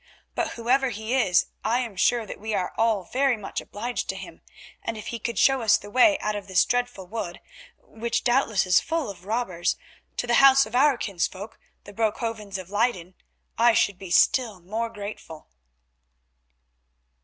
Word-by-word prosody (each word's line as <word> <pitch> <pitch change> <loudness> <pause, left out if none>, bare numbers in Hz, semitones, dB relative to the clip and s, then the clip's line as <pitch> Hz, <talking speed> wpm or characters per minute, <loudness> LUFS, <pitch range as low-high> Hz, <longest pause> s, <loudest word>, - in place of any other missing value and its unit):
But - - -2
whoever 255 +3 +1
he 220 +1 -4
is 195 -9 +3 0.2
I 225 +3 +1
am 230 -5 -6
sure 235 +4 +2
that - - -8
we 215 +1 -3
are 180 - -2
all 225 -4 +1
very 260 +3 +1
much 205 - -5
obliged 235 +4 -5
to - - -1
him, - - -10 0.4
and 225 - -4
if 215 - -8
he 235 - -5
could 235 +2 -4
show 270 -2 +4
us 220 -2 +4
the 205 - -12
way 290 +6 +5
out 210 0 -1
of 200 -1 -6
this 190 -1 +3
dreadful 245 -6 -2
wood, 180 -3 -5 0.4
which 230 +1 -4
doubtless 240 -6 +2
is 180 0 +5
full 325 -9 -2
of 180 -2 -15
robbers, 205 -7 -1 0.4
to - - -1
the 240 - 0
house 275 0 +7
of - - -12
our 275 0 +4
kinsfolk, 195 0 -4 0.2
the 205 - -12
Broekhovens 220 -1 -2
of 185 0 -9
Leyden, 205 -5 0 0.5
I 235 0 +5
should 200 -5 +1
be 190 - -9
still 220 +3 +3
more 220 +6 -3
grateful." 200 -7 -9
220 Hz, 180 wpm, -25 LUFS, 195-245 Hz, 0.5 s, house